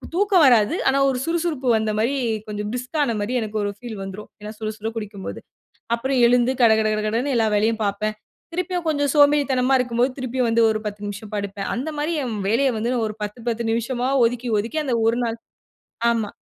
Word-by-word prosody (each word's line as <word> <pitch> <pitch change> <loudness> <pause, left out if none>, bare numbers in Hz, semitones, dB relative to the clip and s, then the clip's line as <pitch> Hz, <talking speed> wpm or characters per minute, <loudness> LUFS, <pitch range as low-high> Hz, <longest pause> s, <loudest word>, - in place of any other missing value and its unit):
தூக்கம் 390 -4 +4
வராது. 235 0 +5
ஆனா, 270 - +3
ஒரு 260 - -1
சுறுசுறுப்பு 330 -5 -1
வந்தமாரி 220 +4 0 0.3
கொஞ்சம் 210 0 -4
பிரிஸ்க்கானமாரி 250 -4 -1
எனக்கு 215 -1 -4
ஒரு 205 - -1
ஃபீல் 230 -1 -8
வந்துரும். 195 +2 -8
ஏன்னா 210 0 -6
சுடசுட 220 0 -4
குடிக்கும்போது. 205 -3 -6 0.6
அப்புறம் 260 +2 -1
எழுந்து 245 +1 +3
கடகடகடன்னு 220 +3 +2
எல்லா 225 -1 +3
வேலையும் 220 +1 +1
பார்ப்பேன். 210 +2 -1 0.4
திருப்பியும் 360 -1 -2
கொஞ்சம் 285 -3 +1
சோம்பேறித்தனமா 280 -3 +4
இருக்கும்போது, 245 +1 +1
திருப்பியும் 255 -1 -1
வந்து 230 0 +4
ஒரு 215 0 -1
10 205 0 -5
நிமிஷம் 205 +1 -7
படுப்பேன். 200 -1 -4
அந்தமாரி 300 +4 -2
என் 230 -4 -3
வேலைய 260 +6 +3
வந்து 235 +3 -1
நான் 230 -3 0
ஒரு 215 - -8
10- 210 +3 -7
10 235 0 -2
நிமிஷமா 240 +2 -1 0.2
ஒதுக்கி, 240 +1 -3
ஒதுக்கி 235 +9 -3
அந்த 255 -4 0
ஒரு 235 +2 +1
நாள். 230 0 -3 0.7
ஆமா. 225 -3 -1
235 Hz, 170 wpm, -22 LUFS, 215-265 Hz, 0.7 s, வராது